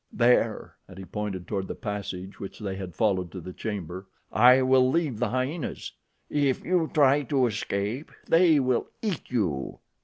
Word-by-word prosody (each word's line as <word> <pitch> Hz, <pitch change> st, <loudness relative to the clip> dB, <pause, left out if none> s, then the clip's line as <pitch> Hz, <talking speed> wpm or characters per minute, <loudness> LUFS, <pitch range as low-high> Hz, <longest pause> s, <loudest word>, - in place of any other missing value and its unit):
There," 120 Hz, -2 st, +2 dB
and 95 Hz, -, -13 dB
he 95 Hz, -, -8 dB
pointed 95 Hz, -3 st, -5 dB
toward 95 Hz, -2 st, -2 dB
the -, -, -5 dB
passage 100 Hz, -2 st, -5 dB
which 100 Hz, -, -7 dB
they 100 Hz, -3 st, -4 dB
had 95 Hz, -3 st, -7 dB
followed 95 Hz, -6 st, +1 dB
to 95 Hz, -, -5 dB
the 90 Hz, +2 st, -8 dB
chamber, 95 Hz, -3 st, -5 dB, 0.2 s
"I 125 Hz, +4 st, +6 dB
will 130 Hz, 0 st, +4 dB
leave 145 Hz, -7 st, 0 dB
the 120 Hz, -2 st, +1 dB
hyenas. 130 Hz, +7 st, -3 dB, 0.4 s
If 140 Hz, -3 st, 0 dB
you 175 Hz, -3 st, +1 dB
try 145 Hz, -1 st, +4 dB
to 135 Hz, -1 st, +1 dB
escape, 105 Hz, +4 st, -3 dB, 0.2 s
they 165 Hz, -2 st, +5 dB
will 130 Hz, -2 st, +1 dB, 0.2 s
eat 200 Hz, -8 st, -3 dB
you." 90 Hz, -, -1 dB
115 Hz, 165 wpm, -27 LUFS, 95-130 Hz, 0.4 s, I